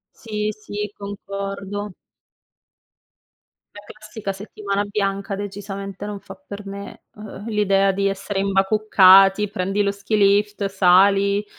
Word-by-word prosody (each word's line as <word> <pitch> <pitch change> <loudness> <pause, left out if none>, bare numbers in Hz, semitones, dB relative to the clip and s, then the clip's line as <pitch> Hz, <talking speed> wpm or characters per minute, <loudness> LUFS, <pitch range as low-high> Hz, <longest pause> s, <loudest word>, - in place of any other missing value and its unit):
Sì, 210 -2 -3
sì, 210 -1 -6
concordo. 200 0 -6 1.9
La 205 - -9
classica 215 -1 -7
settimana 200 0 -4
bianca 200 0 -2
decisamente 200 0 -6
non 205 -1 -6
fa 200 - -11
per 210 -8 -10
me. 200 0 -9
Uhm, 210 -1 -10
l'idea 195 -2 +2
di 195 +1 0
essere 195 0 -3
imbacuccati, 195 0 +5
prendi 195 +1 -1
lo 200 - +1
skilift 200 0 +1
sali, 195 +2 +3
200 Hz, 110 wpm, -21 LUFS, 195-210 Hz, 1.9 s, imbacuccati